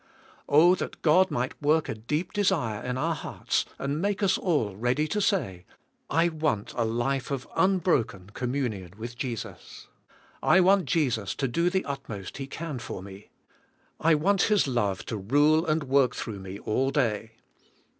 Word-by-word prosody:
Oh, 160 +5 +6
that 185 - -5
God 185 +4 +5
mig 130 -4 -1
ht - - -18
work 155 +2 +2
a - - -2
deep 150 +11 -3
de 205 - +1
sire 120 - 0
in 125 0 -2
our 165 +5 0
hearts 150 - -2
and 140 +3 -2
make 200 +1 -1
us 190 -1 +4
all 145 - 0
ready 125 +8 0
to 210 +5 -1
say, 95 - 0 0.5
I 165 +1 +3
want 155 -10 -1
a 120 - +1
life 120 +4 -1
of 135 -2 -3
unbroken 160 - +1
communion 120 -8 -3
with 120 +2 -7
Jesus. 120 -3 -7 0.5
I 190 - +5
want 190 0 +4
Jesus 120 - 0
to 135 - -1
do 170 +8 +1
the 190 +1 -1
utmost 120 -9 -6
He 135 -1 -5
can 150 -2 -5
for 95 -5 -7
me. 100 +1 -12 0.7
I 160 0 +4
want 190 +5 +2
His 205 -8 +3
love 105 -7 -1
to 110 - -4
rule 145 - +3
and 155 0 +1
work 135 -2 +2
throug 110 -4 -5
h - - -10
me 95 +1 -7
all 130 +6 0
day. 115 -5 -1
140 Hz, 175 wpm, -27 LUFS, 115-165 Hz, 0.7 s, Oh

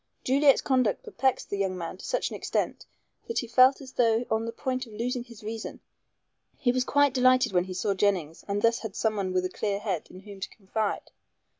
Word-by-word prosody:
Juliet's 275 +1 +4
conduct 255 -6 +1
perplexed 265 -1 -1
the 200 - -2
young 190 -2 0
man 170 +1 -5
to - - -13
such - - -1
an - - -5
extent - - -2 0.4
that 460 - -3
he 245 - +1
felt 255 +3 +5
as 260 -2 -10
though 230 -1 +2
on 220 +1 +1
the - - -2
point 255 0 -3
of 220 - -13
losing 240 +3 -2
his 235 -3 -14
reason. 220 +1 -6 0.8
He 245 - +2
was 255 0 +1
quite 285 0 +3
delighted 255 -2 +4
when 180 -1 +2
he 185 -1 -6
saw 200 +2 0
Jennings 185 -5 0
and 205 0 -1
thus 230 0 +3
had 220 -4 -7
someone 205 -4 0
with 185 0 +1
a - - -1
clear 200 +1 -2
head 195 -6 -3
in 185 - -12
whom 200 -1 -11
to 190 - -4
confide. 210 +1 -3
220 Hz, 215 wpm, -27 LUFS, 195-255 Hz, 0.8 s, felt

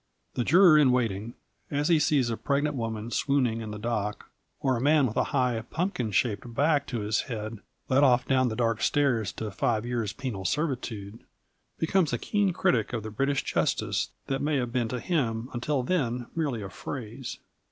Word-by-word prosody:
The 120 - 0
juror 170 +2 +7
in 135 -4 +5
waiting, 115 -2 -1 0.3
as 145 +1 0
he 165 -3 +4
sees 140 -5 +2
a - - 0
pregnant 145 +4 0
woman 115 -2 -4
swooning 125 -3 +1
in 110 - -6
the 105 - -5
dock 105 -2 -3 0.3
or 130 -1 +1
a 115 - -2
man 145 +1 +4
with 110 - -3
a - - +2
high, 125 -4 0
pumpkin 165 - -1
shaped 110 +3 0
back 145 0 +2
to 120 -4 -3
his 105 +2 +1
head 110 -2 -5 0.3
led 135 +2 +4
off 125 -2 +4
down 130 -1 +3
the 110 - -3
dark 115 -2 0
stairs 125 -9 +2
to 110 +1 -5
five 110 +4 0
years' 120 -4 -1
penal 105 -2 -5
servitude, 115 - -2 0.6
becomes 165 -1 +2
a - - +2
keen 205 - +1
critic 120 - +1
of 115 -3 -2
the 110 - -6
British 135 +5 0
justice - - 0 0.2
that 135 0 -2
may 150 +1 +1
have 125 -3 -1
been 120 -3 +1
to 125 +2 -3
him 120 -8 -1
until 130 +2 -1
then 125 -7 0
merely 145 -10 -1
a 95 - -6
phrase. 120 +3 -6
125 Hz, 190 wpm, -28 LUFS, 110-145 Hz, 0.6 s, juror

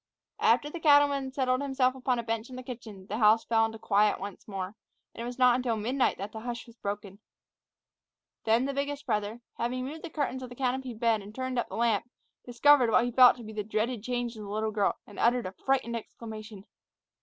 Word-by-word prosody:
After 295 - +3
the 335 +3 -6
cattleman 285 -3 +4
settled 255 -1 0
himself 265 -2 +1
upon 255 -1 -1
the 235 - -2
bench 225 +1 -3
in 255 - -9
the 255 - -7
kitchen, 220 -6 -9
the 215 - -4
house 220 +1 +5
fell 225 -1 +3
into 225 0 -8
quiet 210 -1 +2
once 200 0 -8
more; 195 0 -5 0.4
and - - -8
it - - -4
was 245 0 -6
not 250 -1 +5
until 250 -2 0
midnight 245 +5 0
that 200 +3 -6
the 220 - -7
hush 235 0 -5
was 235 -2 -16
broken. 200 -2 -5 1.2
Then 230 +3 +3
the 280 - -2
biggest 285 +1 -3
brother, 215 -1 -2 0.2
having 250 +2 -1
moved 310 +4 -7
the 345 - -5
curtains 275 -4 -2
of 255 - -7
the 245 - -10
canopied 255 -2 -2
bed 225 -2 +2
and 205 +2 -12
turned 255 -1 -2
up - - -2
the - - -6
lamp, 230 -1 +1 0.3
discovered 250 +1 +5
what 230 - +4
he 245 - -2
felt 250 0 +7
to 240 - -10
be 220 0 -9
the 210 -1 -3
dreaded 220 +2 -1
change 245 0 -3
in 215 - -9
the 205 - -8
little 215 +1 -1
girl, 205 -2 +1
and 205 - -12
uttered 240 +1 +3
a 185 - -4
frightened 235 +3 -1
exclamation. 215 -3 -8
235 Hz, 225 wpm, -29 LUFS, 215-255 Hz, 1.2 s, felt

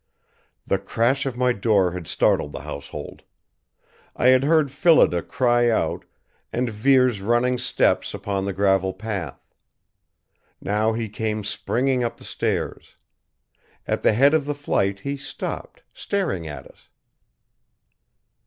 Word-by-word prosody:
The - - 0
crash 130 +5 0
of 125 -2 -4
my 125 0 +2
door 100 -4 +2
had 90 -2 -7
startled 75 - +1
the - - -6
household. 70 0 -8 0.9
I 125 - +3
had 130 0 +5
heard 155 -2 +3
Phillida 140 - +4
cry 120 +1 +2
out, 115 - -1 0.5
and 120 0 -1
Vere's 125 0 +3
running 120 +4 +1
steps 125 - +1
upon 100 -1 -3
the 100 - -1
gravel 95 -1 +1
path. 100 -4 -6 1.1
Now 105 +3 0
he 115 0 -3
came 110 0 -3
springing 125 +4 0
up 120 0 -3
the - - -15
stairs. - - -3 0.9
At - - -1
the - - +4
head 140 +7 +4
of 155 -3 +2
the 145 0 -2
flight 100 -8 -1
he 140 +4 -3
stopped, 135 - -7
staring 170 - -2
at 75 -3 -8
us. - - -20
115 Hz, 135 wpm, -23 LUFS, 100-130 Hz, 1.1 s, had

